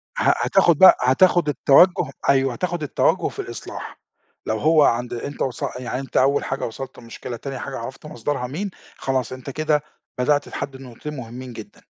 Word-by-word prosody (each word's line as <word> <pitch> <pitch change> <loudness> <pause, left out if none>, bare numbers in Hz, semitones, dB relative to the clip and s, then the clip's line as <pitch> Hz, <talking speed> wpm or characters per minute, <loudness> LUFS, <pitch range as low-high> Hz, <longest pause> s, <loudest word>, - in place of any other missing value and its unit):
ه - - +3
هتاخد 175 -5 +4
بقى، 190 - +9
هتاخد 160 +5 +4
التوجُّه 155 +2 +4 0.2
أيوه، 135 -2 +3
هتاخد 175 +3 -3
التوجُّه 145 - +1
في - - -8
الإصلاح - - -7 0.5
لو 110 - -1
هو 155 0 +5
عند 120 -1 +1
أنت 140 +4 -6
وص 130 -3 -2 0.2
يعني 125 +1 -4
أنت 135 - -4
أول 140 +2 +3
حاجة 135 - -3
وصَلت 130 +3 -7
للمشكلة 120 +1 -8
تاني 135 -1 -6
حاجة - - -5
عرَفت 130 +6 -8
مصدرها 130 -1 -3
مين، 185 +9 -4 0.3
خلاص 130 -3 -1
أنت 130 +1 -8
كده 150 +1 0 0.4
بدأت 145 +3 +1
تحدّد 135 -1 -6
نقطتين 135 +4 -8
مهمّين 125 +1 -8
جدًا. - - -11
135 Hz, 170 wpm, -22 LUFS, 125-150 Hz, 0.5 s, بقى